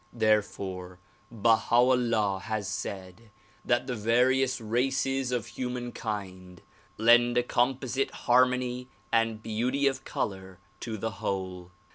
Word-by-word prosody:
Therefore 95 -4 -1 0.3
Baha 115 +1 +2
'Ullah 120 -5 +3
has 110 -2 -2
said 95 +3 -6 0.3
that 120 +1 +1
the 125 - -3
various 125 +4 +2
races 130 +3 0
of 120 -4 -2
hu 125 -1 -4
man 120 -1 -4
kind 95 -5 -6 0.4
lend 120 +2 +5
a 120 - +4
composite 130 +2 0 0.2
harmony 125 0 +2 0.2
and 115 -1 +1
beauty 125 +6 0
of 135 -1 0
color 95 -2 -4 0.2
to 110 -2 -5
the 110 +2 -3
whole. 95 -2 -3
115 Hz, 120 wpm, -28 LUFS, 105-125 Hz, 0.4 s, lend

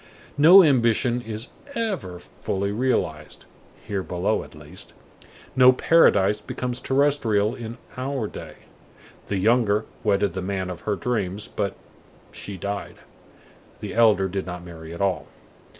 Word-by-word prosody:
No 180 +6 +9
ambition 120 -3 +2
is 115 +1 -6 0.3
ever 195 - -2
fully 100 +3 -4
realized, 100 -10 -2 0.4
here 100 -3 -2
below 90 +4 -1
at - - -15
least. 75 +4 -9 0.6
No 130 -1 +8
paradise 105 -8 +4
becomes 125 -1 -4
terrestrial 130 -7 +2
in 120 -1 -7 0.2
our 130 -2 -2
day. - - -9 0.7
The 100 - -1
younger 110 +1 +2 0.2
wedded 100 -3 +1
the 95 - -3
man 95 -1 -3
of 85 -1 -8
her 105 - +2
dreams, 100 0 -2
but 100 -2 -3 0.6
she 100 -2 -8
died. 100 +3 -5 0.8
The - - -6
elder 110 -4 +4
did 95 0 -4
not 90 -1 -6
marry 80 -2 -10
at 85 - -7
all. 95 -2 0
105 Hz, 135 wpm, -24 LUFS, 95-125 Hz, 0.8 s, No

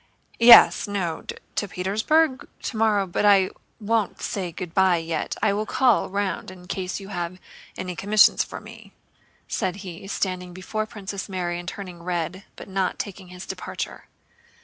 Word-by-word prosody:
"Yes... 235 -1 +9
no... 185 -5 -2 0.3
to 205 - -1
Petersburg? 220 - +1 0.2
Tomorrow—but 210 -5 +1
I 195 -2 +5 0.3
won't 220 -2 0
say 190 -6 -3
good 170 0 -7
by 190 -2 +4
yet. 165 -1 -3
I - - +4
will 215 +2 -2
call 250 -5 +3
round 200 -1 -2
in 185 -1 -12
case 185 +1 -3
you 195 0 -10
have 175 -2 -4 0.4
any 180 -1 -4
commissions 210 +4 +5
for - - -8
me," - - -13 0.5
said 190 -4 -1
he, 180 +1 -8
standing 185 -2 -3
before 215 +4 -3
Princess 200 -2 -6
Mary 175 -2 -2
and 175 - -9
turning 180 -4 -8
red, 180 +2 -3
but - - -10
not 190 -1 -1
taking 195 -2 -6
his 180 +1 -9
departure. - - -6
190 Hz, 150 wpm, -24 LUFS, 180-205 Hz, 0.5 s, Yes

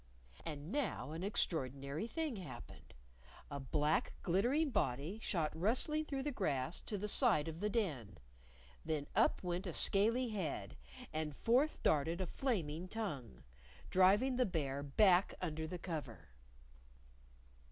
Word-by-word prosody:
And 150 +2 -5
now 265 - -1
an 165 +3 -4
extraordinary 140 - 0
thing 310 -3 -2
happened: 180 - -10 0.6
A 140 - -3
black 150 +3 +1
glittering 250 - +2
body 150 - -1
shot 160 -8 0
rustling 255 - +2
through 275 -3 -3
the 295 - -1
grass 155 - -1
to 210 - -2
the 210 +2 -3
side 205 - +3
of 160 0 -5
the 210 +2 0
Den. 140 - -2 0.7
Then 155 -3 -1
up - - +3
went 180 +1 -2
a - - -3
scaly 230 +5 +2
head, 155 - -3 0.4
and 155 -2 -2
forth 260 - +2
darted 160 +3 +2
a 185 - 0
flaming 180 - -2
tongue 150 - -5 0.5
driving 205 +8 +5
the 255 - +4
Bear 140 -6 -2
back 180 +6 +4
under 160 -3 -3
the 180 - -4
cover! 135 - -6
175 Hz, 135 wpm, -37 LUFS, 150-220 Hz, 0.7 s, driving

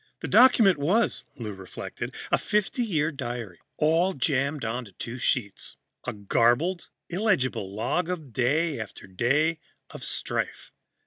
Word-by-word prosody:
The - - -3
document 225 - +6
was, 200 +11 +1
Lou 110 -4 -5
reflected, 95 -1 -7 0.2
a - - +4
fifty 210 +5 0
year 160 -8 +1
diary, 120 - -5 0.2
all 165 +5 +3
jammed 140 0 0
onto 115 -2 -4
two 120 +7 -6
sheets 105 -4 -1 0.3
a - - -1
garbled, 120 - +1 0.2
illegible 170 - 0
log 135 - -1
of 155 -9 -5
day 145 +4 +1
after 110 -3 -7
day 140 - +1 0.3
of - - -9
strife. - - -3
140 Hz, 130 wpm, -27 LUFS, 115-170 Hz, 0.3 s, document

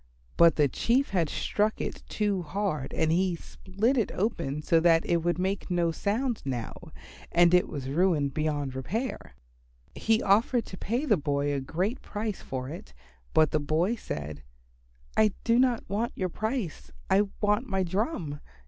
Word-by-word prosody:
But 170 -2 +6
the 150 -2 +4
Chief 245 - +1
had 170 -5 +1
struck 210 +1 0
it - - -4
too 205 -3 0
hard 165 -4 -2
and 160 -1 +1
had 180 0 +1
split 205 +11 -1
it 220 - 0
open 165 -8 -1
so 165 - +4
that 165 0 +4
it 170 - +2
would 170 0 0
now 180 - -1
make 195 +1 -2
no 175 -2 +1
sound 220 - -1 0.9
and 175 0 +5
it 180 - +5
was 140 -4 -5
ruined 150 -2 +1
beyond 145 -3 -1
repair. 210 - -4 0.6
He 225 0 +1
offered 225 +4 +3
to - - -8
pay 240 +8 -1
the 215 -9 +3
boy 145 -1 0
a 140 - 0
great 185 - -2
price 210 -1 -4
for 130 -1 -5
it, 140 - -9 0.4
but 155 -2 +5
the 155 - +2
boy 155 +8 +1
said, 75 - -6 0.7
"I 215 -2 +4
do 235 +1 +3
not 250 -3 +2
want 215 +5 -1
your 185 -1 -1
price. 210 - -3 0.2
I 205 +1 +3
want 210 +4 +1
my 190 0 +1
drum. 180 - -2
180 Hz, 165 wpm, -28 LUFS, 155-215 Hz, 0.9 s, But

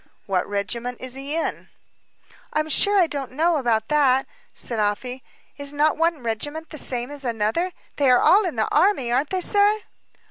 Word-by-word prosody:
"What 190 -1 -1
regiment 235 +5 -3
is 255 -1 -5
he 275 +3 -4
in?" 330 - -3 0.8
"I'm 310 0 0
sure 405 +7 +4
I 360 - +5
don't 275 -5 -5
know 325 +4 +2
about 235 -5 0
that," 270 -3 +3 0.3
said 230 -3 -3
Afy. 245 +5 -2 0.3
"Is 285 0 -2
not 295 +1 +2
one 330 -4 0
regiment 290 +8 -4
the 305 - -4
same 245 +1 -3
as 290 -1 -4
another; 235 +9 -1 0.3
they 280 -2 +3
are 250 - +6
all 405 +3 +5
in 330 - -4
the 220 -1 0
army, 310 -8 +3
aren't 265 +4 +1
they, 375 -1 -1
sir?" 415 +2 +3
280 Hz, 180 wpm, -23 LUFS, 240-320 Hz, 0.8 s, are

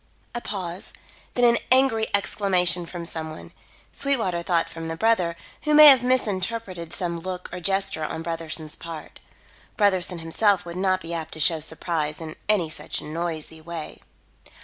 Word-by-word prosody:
A 240 - -3
pause; 185 -4 -5 0.4
then 245 - +2
an 235 -1 +6
angry 255 -4 +5
exclamation 180 -4 +1
from 170 -1 -7
some 160 -1 -5
one. 155 - -10 0.4
Sweetwater 225 -11 0
thought 170 -1 +1
from 165 0 -7
the 165 - -3
brother, 185 -5 +2 0.3
who 300 -1 +2
may 305 0 +10
have 265 -3 +7
misinterpreted 205 -7 -1
some 170 -1 -2
look 180 +1 -5
or 180 - -4
gesture 195 -2 +1
on 160 +1 -4
Brotherson's 165 -2 -3
part. 165 -2 -9 0.6
Brotherson 185 -4 +2
himself 185 +5 +2
would 170 0 -7
not 185 0 +1
be 170 0 -6
apt 165 -2 -4
to - - -9
show 160 +1 +2
surprise 155 -1 -2
in 160 -1 -7
any 200 -6 +3
such 155 - -3
noisy 160 0 -4
way. 165 -1 -7
175 Hz, 160 wpm, -24 LUFS, 165-200 Hz, 0.6 s, may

